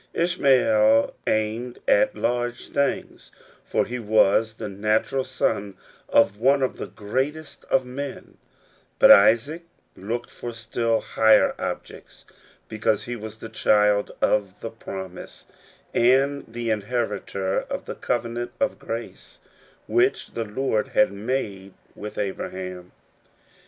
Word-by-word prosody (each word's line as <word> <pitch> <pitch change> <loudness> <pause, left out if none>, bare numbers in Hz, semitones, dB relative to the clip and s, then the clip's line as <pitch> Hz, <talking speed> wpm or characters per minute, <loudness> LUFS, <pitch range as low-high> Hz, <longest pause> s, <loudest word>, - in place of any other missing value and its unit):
Ishmael 125 -10 +3
aimed 110 +3 -1
at - - +3
large 120 0 -2
things, 140 0 -2 0.3
for - - 0
he 125 +2 -5
was 110 0 +3
the 110 -1 -6
natural 110 +6 0
son 105 -6 -2 0.3
of 100 -3 +4
one 135 +3 +3
of 130 - -1
the - - -5
greatest 135 +9 -4
of 130 - +1
men; 135 +2 -7 0.6
but - - +8
Isaac 115 +11 +5 0.3
looked, 115 +5 -5
for 120 - -7
still 115 0 -1
higher 110 0 +4
objects, - - -7 0.4
because 110 -1 0
he 120 - -5
was 110 -1 -8
the 115 - -9
child 105 -2 +2
of 100 -2 +1
the 115 - -5
promise, 95 -5 -9 0.5
and 135 +4 +3
the 120 0 -2
inheritor 105 -3 -2
of - - -6
the - - -5
covenant 120 0 -3
of 275 - 0
grace - - -7 0.5
which 370 +3 +1
the 115 - -3
Lord 110 0 -1
had 105 - +3
made 100 -3 -4 0.2
with 105 0 -8
Abraham. 90 -2 -5
115 Hz, 120 wpm, -24 LUFS, 105-125 Hz, 0.6 s, but